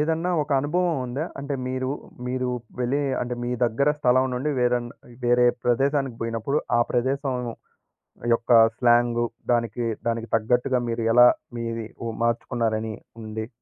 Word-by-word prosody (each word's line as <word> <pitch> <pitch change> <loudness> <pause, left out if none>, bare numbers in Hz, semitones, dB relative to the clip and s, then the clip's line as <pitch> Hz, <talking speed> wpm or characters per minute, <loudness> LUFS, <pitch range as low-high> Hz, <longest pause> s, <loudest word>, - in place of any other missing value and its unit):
ఏదన్నా 165 +3 0
ఒక 145 - -10
అనుభవవుందా? 145 -3 -1 0.2
అంటే, 140 0 -3
మీరు, 130 0 -2 0.4
మీరూ 125 0 -1 0.3
వెళ్ళీ 130 +4 +1 0.2
అంటే, 125 0 -2
మీ 120 - -2
దగ్గర 120 +5 +1
స్థలం 130 0 +4
నుండి 135 +5 -1
వేరన్ 120 -1 +1 0.4
వేరే 120 0 +4 0.2
ప్రదేశానికి 135 +1 +1
పొయినప్పుడు, 115 +5 -1 0.2
ఆ - - +4
ప్రదేశం 130 +2 0 1.0
యొక్క 115 +1 -1 0.3
స్లాంగు, 120 -1 +3 0.3
దానికి, 120 0 0 0.2
దానికి 115 0 -1
తగ్గట్టుగా 125 +3 +1
మీరు 115 0 -2
ఎలా 125 +1 +8 0.3
మీది 115 -1 -4 0.2
ఉ - - -2
మార్చుకున్నారని 115 -2 -1 0.3
ఉంది? 110 0 -5
125 Hz, 130 wpm, -24 LUFS, 115-135 Hz, 1.0 s, ఎలా